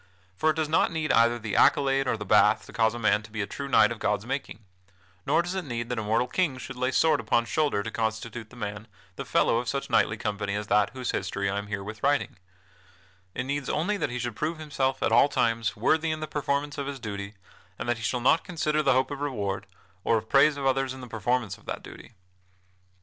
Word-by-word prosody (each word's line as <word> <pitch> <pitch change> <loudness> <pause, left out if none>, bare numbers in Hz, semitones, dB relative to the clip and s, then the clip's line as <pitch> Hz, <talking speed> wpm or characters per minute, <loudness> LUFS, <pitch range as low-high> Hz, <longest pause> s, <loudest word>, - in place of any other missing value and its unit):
For 155 - +2
it 155 - +2
does 160 -1 0
not 155 - +2
need 160 -2 -1
either 115 +1 +4
the 110 -3 -4
accolade 135 -1 +4
or 115 - +1
the 105 - -6
bath - - +4
to - - -13
cause 110 0 +2
a - - -4
man 110 -2 +2
to 110 - -13
be 110 0 -6
a - - -2
true 140 +7 -6
knight 120 -4 +5
of 115 - -5
God's 105 0 0
making; 125 -5 -5 0.6
nor - - +3
does 175 +2 -4
it 190 -1 -2
need 120 -4 -4
that 125 -2 -2
a - - -3
mortal 110 +4 +1
King 160 -6 0
should 130 +1 -8
lay 130 +1 0
sword 160 +4 +3
upon 115 +1 +1
shoulder 145 -7 0
to 110 - -5
constitute 110 0 -3
a - - -13
man 105 -1 -6 0.3
the - - -6
fellow - - +2
of 120 -1 -3
such 140 +3 -3
knightly 110 - +3
company 100 -1 -2
as 105 0 -3
that 105 0 +3
whose 130 -2 -3
history 100 +1 -2
I 100 - -1
am 100 - -7
herewith 105 +1 -5
writing; 140 -6 +1 1.0
it 125 - -1
needs 140 +1 -3
only 180 +8 0
that 185 - -1
he 125 - -4
should 120 -2 -3
prove 155 +6 -2
himself 140 -4 -1
at - - +2
all 120 +5 +6
times 115 -5 0
worthy 160 +9 +2
in 155 0 -2
the 155 - -3
performance 145 -1 -2
of 140 - -3
his 140 -1 -5
duty, 100 -2 -6 0.4
and - - -5
that 120 -1 +1
he 115 - -8
shall 120 +3 -1
not 145 +6 +4
consider 155 -3 0
the 135 -3 +3
hope 130 +2 +1
of 140 0 -5
reward, 100 -8 -3 0.4
or 115 - +3
of 110 - -6
praise 140 +1 +5
of 140 - -4
others 135 0 +1
in 130 - -10
the 125 - -8
performance 115 -1 -1
of - - -24
that - - -5
duty. - - -12
120 Hz, 240 wpm, -27 LUFS, 110-140 Hz, 1.0 s, all